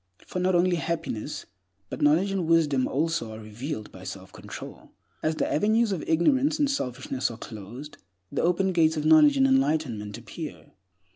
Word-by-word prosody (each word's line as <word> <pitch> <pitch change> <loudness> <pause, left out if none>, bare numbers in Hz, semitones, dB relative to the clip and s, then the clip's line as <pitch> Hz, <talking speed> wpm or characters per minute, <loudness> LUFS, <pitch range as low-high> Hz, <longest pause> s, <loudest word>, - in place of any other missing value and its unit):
For 180 - -4
not 185 0 +2
only 175 0 +3
happiness, 165 -10 -3 0.5
but - - -5
knowledge 160 +7 +4
and 190 -4 -1
wisdom 150 -6 +3
also 145 -6 -1
are - - -9
revealed 110 +2 -6
by - - -12
self - - -8
control. - - -10 0.3
As 155 0 0
the - - 0
avenues 215 +6 +2
of 180 -6 -2
ignorance 265 - +3
and 290 - +2
selfishness 130 - -2
are 115 - -8
closed, 115 +7 -9 0.3
the - - -1
open 185 +2 +2
gates 160 -3 +3
of 150 - -2
knowledge 300 - +6
and 270 - +5
enlightenment 150 - +1
appear. 145 +3 -8
160 Hz, 165 wpm, -26 LUFS, 130-190 Hz, 0.5 s, knowledge